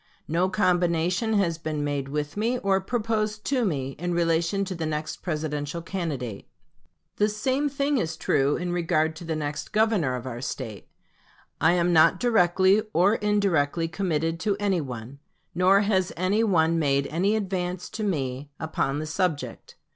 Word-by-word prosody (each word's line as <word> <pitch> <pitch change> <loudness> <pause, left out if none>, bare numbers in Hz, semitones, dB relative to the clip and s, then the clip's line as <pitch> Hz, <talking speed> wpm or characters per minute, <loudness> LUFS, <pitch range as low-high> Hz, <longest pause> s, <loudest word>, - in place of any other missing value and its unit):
No 175 +4 +1
combination 180 +2 +1
has 175 -6 +1
been 155 -2 -3
made 145 -2 -2
with 150 0 -3
me, 230 +4 0
or 195 -3 +1
proposed 215 0 -2
to 265 -3 +1
me, 140 -9 -1
in 175 0 -2
relation 170 +3 +1
to 190 - -4
the 165 -3 -3
next 155 0 -3
Presidential 150 -1 -3
candidate. 145 - -4 0.7
The 210 +1 +3
same 260 +7 0
thing 280 0 0
is 160 -4 -2
true 140 +2 +2
in 175 +1 -3
regard 160 -2 +1
to 175 - -9
the 165 -1 -2
next 145 -1 -4
Governor 210 - +2
of 125 0 -6
our 120 -2 -5
State. 115 -6 -6 0.7
I 160 +2 +5
am 175 0 +2
not 165 +3 +5
directly 190 -3 +4
or 185 +5 +4
indirectly 190 -8 +1
committed 165 -1 -1
to 205 +1 0
any 195 -4 +1
one; 125 0 -7 0.3
nor 190 +3 +4
has 190 -3 +1
any 190 +5 +2
one 165 -5 +3
made 140 -2 +2
any 185 +9 +1
advance 185 -3 -2
to 220 - -4
me 140 -7 -2
upon 150 -3 -1
the 155 - -3
subject. 155 - -3
170 Hz, 160 wpm, -26 LUFS, 150-200 Hz, 0.7 s, I